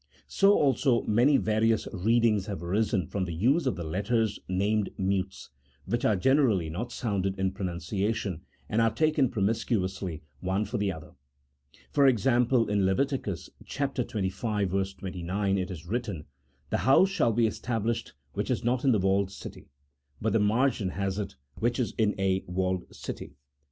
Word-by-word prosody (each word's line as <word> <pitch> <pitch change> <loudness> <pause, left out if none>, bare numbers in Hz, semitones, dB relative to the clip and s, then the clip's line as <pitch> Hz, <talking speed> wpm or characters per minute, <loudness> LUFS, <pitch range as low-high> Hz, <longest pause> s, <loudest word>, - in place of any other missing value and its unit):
So 200 +1 +4
also 135 - +3
many 125 +7 +4
various 110 +1 +1
readings 110 +1 +2
have 100 -5 -5
arisen 100 +1 +1
from 95 +4 -2
the 85 -2 -5
use 135 - +2
of 130 - +1
the 85 - -5
letters 105 +6 0
named 100 +3 +1
mutes, 95 0 -2 0.3
which 120 +1 -1
are 110 - +4
generally 110 - +2
not 105 +9 -4
sounded 95 -4 -2
in 95 0 0
pronunciation, 95 0 -2 0.3
and 110 +2 +1
are 115 - +4
taken 155 0 +2
promiscuously, 95 - -1 0.2
one 95 +5 -1
for 115 +2 -3
the 100 -1 +1
other. 80 -3 -9 0.8
For 140 -1 +5
example, 125 0 +3
in 100 -1 +1
Levit. 95 +9 +2
xxv. 100 - -2
29, 95 +2 -2
it 95 +1 -3
is 85 -4 -7
written, 105 -6 -3 0.2
" 65 +2 -39
The - - +2
house 135 +9 +5
shall 195 -12 +2
be 115 +1 +2
established 115 +1 -2 0.2
which - - -3
is - - 0
not 120 +1 +1
in 135 -3 +4
the 105 - +2
walled 95 +1 +1
city," - - -10 0.5
but 110 - 0
the 115 - +4
margin 110 0 +2
has 95 +1 -2
it, 100 - -4
" 65 - -18
which 120 +3 0
is 120 - -1
in 105 -2 +1
a 95 -1 +1
walled 95 0 -2
city." - - -7
105 Hz, 160 wpm, -28 LUFS, 95-120 Hz, 0.8 s, For